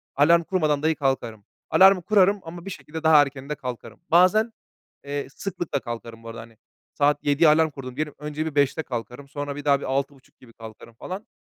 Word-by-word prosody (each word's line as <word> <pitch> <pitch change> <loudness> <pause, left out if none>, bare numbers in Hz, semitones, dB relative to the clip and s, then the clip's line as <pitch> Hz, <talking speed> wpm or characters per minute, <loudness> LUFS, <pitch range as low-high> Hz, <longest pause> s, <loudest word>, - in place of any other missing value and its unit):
alarm 170 +4 +4
kurmadan 155 -5 0
dahi 160 0 +2
kalkarım. 120 -7 -2 0.2
Alarmı 190 0 +6
kurarım 200 +1 +3
ama 170 +2 -10
bir - - -5
şekilde 160 -3 -8
daha 160 -2 +7
erken 140 -1 -4
de 150 - -2
kalkarım. 120 -4 -8
Bazen, 185 +7 +4 0.5
eee, 140 -1 -4
sıklıkla 170 -2 -4
kalkarım 115 -2 -8
bu 115 - -9
arada, 115 0 -8
hani. 115 0 -15 0.4
Saat 145 0 +1
07.00'ye 145 +3 +4
alarm 160 +1 +4
kurdum 130 -3 -9
diyelim; 150 0 -3
önce 150 +1 -4
bir 160 -2 -5
05.00'de 145 +2 +1
kalkarım, 125 +2 -7
sonra 145 0 -5
bir 145 0 -8
daha 140 -1 +2
6.30 135 0 -4
gibi 120 -3 -18
kalkarım 115 +1 -12
falan. 185 - -8
145 Hz, 190 wpm, -24 LUFS, 130-160 Hz, 0.5 s, daha